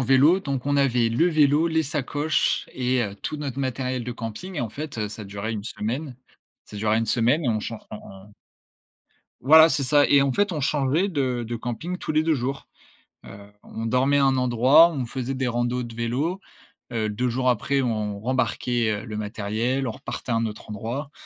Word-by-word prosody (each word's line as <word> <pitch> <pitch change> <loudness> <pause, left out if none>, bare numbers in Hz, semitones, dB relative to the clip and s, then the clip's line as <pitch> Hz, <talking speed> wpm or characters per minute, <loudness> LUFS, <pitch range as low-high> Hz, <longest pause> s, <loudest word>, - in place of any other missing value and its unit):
vélo, 135 +8 +4
donc 140 -6 -4
on 145 0 +1
avait 125 -4 +2
le 165 +10 +3
vélo, 155 0 +3
les 160 -1 +1
sacoches 150 +1 0
et 125 -1 +1
heu, 100 -1 -6
tout 155 - -3
notre 140 -2 -4
matériel 130 -1 -2
de 125 - -5
camping 120 - -7
et - - -1
en 120 - -2
fait, 145 +2 -7
heu, 105 - -1
ça 105 +1 -8
durait 100 +2 -5
une 105 -2 -4
semaine. 125 +5 -4 0.5
Ça 105 - -11
durait 110 +1 +1
une 115 - -1
semaine 125 +8 +2
et - - +1
on 110 -2 0
chan 115 0 -5
on 105 - -6
on 100 +2 -14 1.1
Voilà, 160 +5 +8
c'est 140 -2 0
ça. 145 +1 +4
Et 140 - +6
en 135 -1 +1
fait, 205 +5 +1
on 155 - -2
changeait 145 +6 +1
de 130 -8 -1
de 120 0 -3
camping 120 +11 -4
tous - - -6
les 155 0 +2
2 160 -1 +2
jours, 135 +2 -3 0.6
heu, 100 +1 -12
on 115 - -7
dormait 130 +4 +2
à 140 - +4
un 135 -1 +3
endroit, 130 +6 +6
on 135 -6 -3
faisait 130 +2 -4
des 130 -1 -2
randos 120 +1 -1
de 115 -1 -8
vélo, 130 +11 -2 0.5
heu, 110 -3 -1
2 125 +5 -1
jours 125 +1 +1
après, 135 +4 0
on 105 -4 -2
rembarquait, 120 -1 0
heu, - - -11
le 110 -2 -6
matériel, 110 +5 -2
on 115 - -1
repartait 115 - -6
à - - +2
un 115 0 +1
autre 105 0 -8
endroit 120 +8 -5
125 Hz, 210 wpm, -24 LUFS, 115-145 Hz, 1.1 s, Voilà